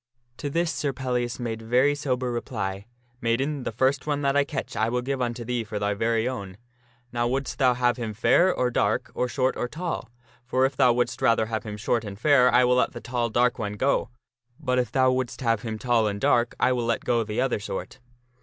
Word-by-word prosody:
To 145 - -4
this 165 +2 0
Sir 145 -3 -2
Pellias 125 -2 -2
made 115 -2 -4
very 125 +6 +3
sober 130 -3 -2
reply, 100 -4 -4 0.2
" 120 0 -38
Maiden, 130 +4 -1
the - - -2
first 130 +5 +1
one 145 -1 -1
that 140 0 +2
I 145 - +5
catch 140 -4 -5
I 110 +2 +1
will 125 +1 -1
give 135 0 -2
unto 120 -1 -2
thee 120 0 -1
for 110 -1 -5
thy 105 0 0
very 115 +2 0
own. 100 -7 -5 0.6
Now 120 0 +1
wouldst 135 +3 -2
thou 130 -3 +4
have 120 0 +1
him 110 -3 -4
fair 175 - +4
or 125 -7 0
dark, - - 0
or 125 - 0
short 130 +1 0
or 120 - -2
tall? 165 +3 -4 0.3
For 130 +2 +1
if 135 0 -1
thou 130 -3 +5
wouldst 120 +2 -1
rather 115 -3 +3
have 110 -1 -4
him 105 -1 -5
short 115 +2 0
and 100 -2 -7
fair 125 +1 +5
I 125 +2 +5
will 125 0 +3
let - - +2
the - - -6
tall, 120 -1 -2
dark 120 +2 +2
one 105 -2 -3
go; 130 +7 0 0.5
but 125 -5 0
if 125 - -1
thou 130 -1 +3
wouldst 130 +1 -2
have 115 -4 +1
him 110 -1 -4
tall 115 -2 +2
and 100 -1 -3
dark, 120 -3 +2
I 125 - +3
will 120 -2 0
let 115 - -1
go 120 -1 +2
the 110 +2 -4
other 130 -3 +1
sort." 105 +4 -6
125 Hz, 230 wpm, -25 LUFS, 115-130 Hz, 0.6 s, I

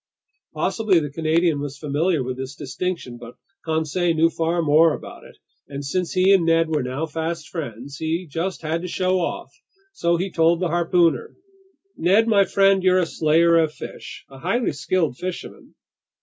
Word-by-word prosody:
Possibly 210 -6 +2
the 150 -3 -5
Canadian 160 +1 +1
was 145 -1 -5
familiar 150 +1 0
with 125 0 -4
this 130 +2 -7
distinction, 135 -2 -5
but 120 0 -11 0.3
Conseil 160 +2 0
knew 165 +1 +3
far 165 +1 -1
more 155 +1 +4
about - - -11
it; - - -16 0.3
and 140 0 -7
since 180 +5 -2
he 185 +1 +4
and 190 -3 +4
Ned 165 0 +2
were 155 -2 0
now 130 +5 -3
fast 160 0 -4
friends, 140 - -7
he 165 +3 -2
just 165 +4 -4
had 160 +2 -2
to 180 - -5
show 185 +1 0
off. 170 - -4 0.4
So 170 - +1
he 185 +2 -3
told 165 0 +3
the 180 -2 -1
harpooner: 170 -3 +1 0.6
"Ned 200 +7 +3
my 200 -3 +4
friend, 195 0 +3
you're 185 0 +3
a 180 - +2
slayer 165 +2 +3
of 160 -2 +1
fish, - - -9
a 135 -1 -14
highly 195 - 0
skilled 160 -9 -1
fisherman. 185 -1 -7
165 Hz, 175 wpm, -22 LUFS, 150-180 Hz, 0.6 s, more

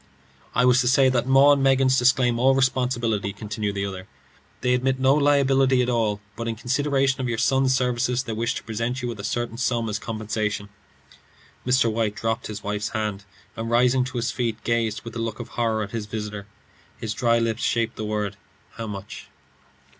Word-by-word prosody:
"I 125 - +4
was 125 0 +5
to 125 - 0
say 130 +1 +5
that 125 -1 0
'Maw 135 +2 +6
and 140 - +1
Meggins' 135 -1 +4
disclaim 125 -1 +3
all 135 +2 +4
responsibility," 125 -6 0
continued 105 0 -4
the 100 0 -1
other. 95 -1 -7 0.5
"They 125 - +2
admit 130 +1 +1
no 130 +1 +4
liability 135 -3 +3
at 125 - -1
all, 110 -3 0 0.2
but 115 +1 -5
in 115 - -2
consideration 135 +2 0
of 125 - -2
your 120 - -1
son's 135 +2 +2
services, 125 0 0
they 115 - -5
wish 115 +2 -1
to - - -5
present 115 +3 -3
you - - -1
with 115 -3 -6
a - - -6
certain 120 +1 -3
sum 120 -2 0
as 105 0 -2
compensation." 110 -2 -3 1.0
Mr. 125 -2 +3
White 110 -2 -1
dropped 115 +2 -2
his 105 -1 -7
wife's 105 +1 -2
hand, 105 -2 -3 0.3
and 115 0 -4
rising 125 +2 +3
to 130 -1 -6
his 115 0 -1
feet, 115 -3 -2
gazed 115 -2 -1
with 115 0 -9
a - - -3
look 115 -1 -3
of 120 -1 -7
horror 110 -2 0
at 100 - -7
his 110 -3 -4
visitor. 105 -2 -5 0.5
His 110 -2 -4
dry 115 +1 +2
lips 115 -1 -1
shaped 115 -1 0
the 110 - -5
words, 105 -1 -2 0.4
"How 115 -1 -4
much?" 100 -1 -8
115 Hz, 200 wpm, -24 LUFS, 110-130 Hz, 1.0 s, Maw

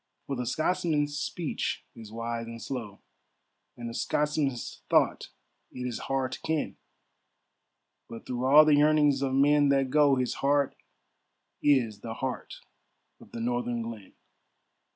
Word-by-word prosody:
For 140 - -3
the 125 -1 -3
Scotsman's 150 0 0
speech 160 +1 -3
is 110 -2 -11
wise 115 0 -4
and 115 0 -8
slow, 115 -6 -6 0.8
And 120 -1 -6
the 115 - -6
Scotsman's 145 -2 -1
thought - - +2 0.4
it 125 - -6
is 120 -2 -3
hard 135 -1 0
to - - -7
ken, 160 -2 -2 1.3
But 115 - -9
through 125 0 -3
all 150 +3 +8
the 155 - +5
yearnings 145 -1 +4
of 135 -1 0
men 145 +1 +4
that 135 -2 +2
go, 145 -2 +5
His 125 -1 -1
heart 140 0 +2 0.9
is 120 -8 +2
the 115 +1 -6
heart 130 +1 -5 0.6
of - - -17
the 115 - -6
northern 120 0 -1
glen. 115 -4 -8
130 Hz, 140 wpm, -28 LUFS, 115-145 Hz, 1.3 s, all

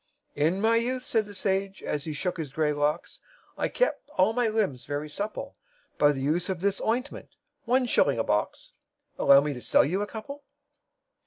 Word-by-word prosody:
"In 160 +6 +1
my 225 +2 +3
youth," 250 +2 -1
said 225 -7 0
the 205 - -11
sage, 195 0 -2
as 145 -1 -3
he 155 - -4
shook 180 +6 -2
his 155 -5 -5
grey 150 +1 +1
locks, 145 +1 -1 0.4
"I - - -1
kept - - -1
all 190 +4 +4
my 245 0 +1
limbs 205 - -1
very 145 +2 -3
supple 205 +8 -5 0.4
By 145 - +6
the 135 -2 -4
use 165 +6 0
of 185 -2 -2
this 200 +1 0
ointment 250 +5 -2 0.4
one 250 +2 +2
shilling 140 - +2
a 115 - +1
box 105 -2 -2 0.5
Allow 140 0 +7
me 145 0 -2
to 125 - -8
sell - - +4
you 185 +8 -1
a 205 - -2
couple?" 280 +7 -8
190 Hz, 190 wpm, -27 LUFS, 145-220 Hz, 0.5 s, Allow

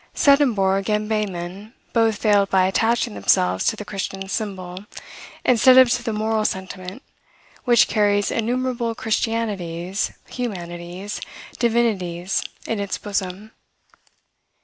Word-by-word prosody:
Swedenborg 215 -9 +3
and 210 0 0
Behmen 200 0 -3 0.2
both 225 -2 +3
failed 205 -2 +3
by 190 -1 +4
attaching 225 - +1
themselves 95 -2 +2
to - - +2
the 210 - -8
Christian 195 0 -5
symbol, 190 -3 -5 0.6
instead 255 +1 +6
of 260 -2 +7
to 245 - +1
the 235 -1 -3
moral 215 0 0
sentiment, 190 +3 -5 0.6
which 240 -2 +5
carries 205 -1 +2
innumerable 240 0 -1
christianities, 205 -6 -2 0.2
humanities, 180 -4 -5 0.4
divinities, 195 -7 0 0.2
in 225 - -2
its 200 -1 -2
bosom. 200 +1 -4
205 Hz, 110 wpm, -22 LUFS, 185-230 Hz, 0.6 s, of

